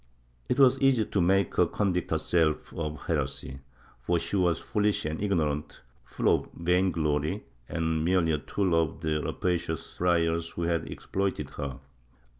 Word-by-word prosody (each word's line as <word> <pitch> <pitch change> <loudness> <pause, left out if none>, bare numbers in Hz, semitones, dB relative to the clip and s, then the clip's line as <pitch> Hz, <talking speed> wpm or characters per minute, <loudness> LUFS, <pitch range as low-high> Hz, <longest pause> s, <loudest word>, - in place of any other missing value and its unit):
It 125 - +1
was 135 -1 +6
easy 135 -5 +3
to 100 - 0
make 95 +1 +2
her 90 - +5
convict 90 -2 -1
her - - +1
self 80 -3 0
of 75 -2 -5
heresy, 65 0 -2 0.4
for 85 +8 +1
she 95 - -3
was 90 -4 +2
fooHsh 105 -6 0
and 80 +3 -4
ignorant, 80 -8 -1 0.2
full - - +1
of - - -1
vain 90 +2 +2
glory, 75 -2 -1 0.3
and 80 -1 0
merely 85 -1 +2
a 75 - +1
tool 95 +3 -1
of 80 -1 +1
the 80 -1 0
rapacious 85 -2 -2
friars 85 -2 +1
who 85 - -5
had 85 -1 -1
exploited 95 -7 -3
her. 70 -3 -5
85 Hz, 160 wpm, -28 LUFS, 80-95 Hz, 0.4 s, was